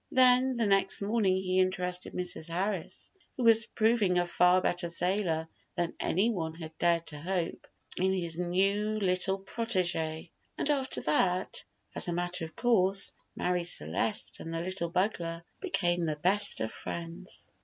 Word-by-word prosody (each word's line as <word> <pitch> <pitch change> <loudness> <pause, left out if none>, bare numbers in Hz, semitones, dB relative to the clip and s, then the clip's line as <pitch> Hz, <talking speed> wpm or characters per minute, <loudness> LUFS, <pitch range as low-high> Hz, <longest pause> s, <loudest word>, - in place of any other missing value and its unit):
Then 255 0 +5
the 230 - +1
next 195 0 +2
morning 205 -3 +2
he 185 0 0
interested 180 -1 -1
Mrs. 180 -3 -4
Harris 185 +1 -3 0.3
(who 255 - -1
was 225 -1 +5
proving 215 -5 +2
a 175 - +3
far 180 +1 +4
better 175 -1 0
sailor 170 -2 0 0.3
than 175 -1 -1
any 205 +7 +1
one 165 -6 -3
had 160 -1 -9
dared 170 -1 +2
to 150 -2 -7
hope) 175 0 -3 0.3
in 190 +1 +2
his 170 -4 -1
new 195 +5 +1
little 190 -1 +1
protégé, 175 -7 -1 0.3
and 300 - +1
after 270 -2 -1
that, 180 +4 +1 0.3
as - - 0
a 175 - -1
matter 175 0 -2
of 160 - -12
course, 200 -5 +2 0.2
Marie 180 -1 0
Celeste 100 - 0
and 165 - -7
the 165 0 -2
little 185 -2 -1
bugler 170 -2 -1 0.2
became 175 - 0
the 155 - -1
best 185 +7 +4
of 110 - -2
friends. 170 +3 -6
180 Hz, 155 wpm, -30 LUFS, 170-200 Hz, 0.3 s, Then